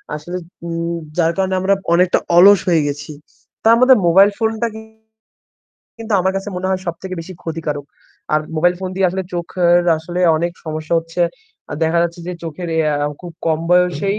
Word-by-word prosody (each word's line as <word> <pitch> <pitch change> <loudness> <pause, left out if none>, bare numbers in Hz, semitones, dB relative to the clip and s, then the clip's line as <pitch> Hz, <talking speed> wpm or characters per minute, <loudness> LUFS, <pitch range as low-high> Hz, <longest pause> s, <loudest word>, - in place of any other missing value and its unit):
আসলে, 175 +4 -6 0.3
উম 170 0 -3 0.2
যার 165 -1 +3
কারণে 190 0 0
আমরা 195 +1 +3 0.2
অনেকটা 180 +1 +3 0.2
অলস 200 +1 +8
হয়ে 160 -4 +3
গেছি। 145 +1 -5 0.5
তার 225 +1 +7
মধ্যে 255 +1 +7
মোবাইল 195 +4 +6
ফোনটা 225 +1 0
কি 220 - -8 1.2
কিন্তু 225 -1 -5
আমার 190 +1 +1
কাছে 195 +1 -4
মনে 185 +1 -3
হয় 185 -1 0
সবথেকে 180 +2 -5
বেশি 175 +3 -9
ক্ষতিকারক। 155 -3 -4 0.5
আর 155 - +3 0.2
মোবাইল 175 +3 +3
ফোন 185 - -3
দিয়ে 190 -1 +3
আসলে 190 0 -3
চোখের 175 0 +2 0.2
আসলে 175 +3 -5 0.2
অনেক 170 +2 -1
সমস্যা 155 +1 -3
হচ্ছে। 165 +1 -6 0.5
আ - - -2
দেখা 165 +1 +1
যাচ্ছে 170 0 -3
যে - - -3
চোখের 165 +2 -6
এ - - +1 0.3
আ 145 - 0
খুব 175 -1 -9
কম 160 -1 +2
বয়সেই 180 +3 +2
175 Hz, 180 wpm, -18 LUFS, 165-190 Hz, 1.2 s, অলস